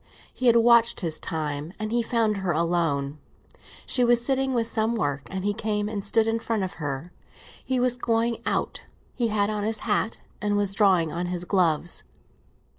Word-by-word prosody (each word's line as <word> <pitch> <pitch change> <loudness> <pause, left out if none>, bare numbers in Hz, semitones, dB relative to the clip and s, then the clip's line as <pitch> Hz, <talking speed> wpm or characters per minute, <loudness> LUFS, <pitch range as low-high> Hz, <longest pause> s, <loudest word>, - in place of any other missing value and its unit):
He 255 - -1
had 235 - +6
watched 235 0 +5
his 160 -3 -3
time, 155 0 -4
and 215 0 -4
he 240 0 +2
found 225 -3 +1
her 190 -3 -1
alone. 155 -4 0 0.7
She 250 - +2
was 240 0 +3
sitting 270 0 +1
with 230 -1 +2
some 225 0 0
work, 145 -9 -2
and 190 0 -4
he 205 - +1
came 210 0 -1
and 210 -2 -4
stood 220 +2 +2
in 225 0 0
front 225 -3 -1
of 185 - -4
her. 145 +4 -4 0.5
He 260 -1 0
was 250 0 +2
going 230 0 0
out, - - -2 0.3
he 240 -2 0
had 210 -1 +1
on 210 -1 -2
his 220 +1 -1
hat 220 +1 0 0.2
and 205 0 +1
was 200 -1 +1
drawing 185 -6 +3
on 175 +2 -3
his 180 0 -3
gloves. 175 -3 +1
210 Hz, 190 wpm, -25 LUFS, 175-230 Hz, 0.7 s, had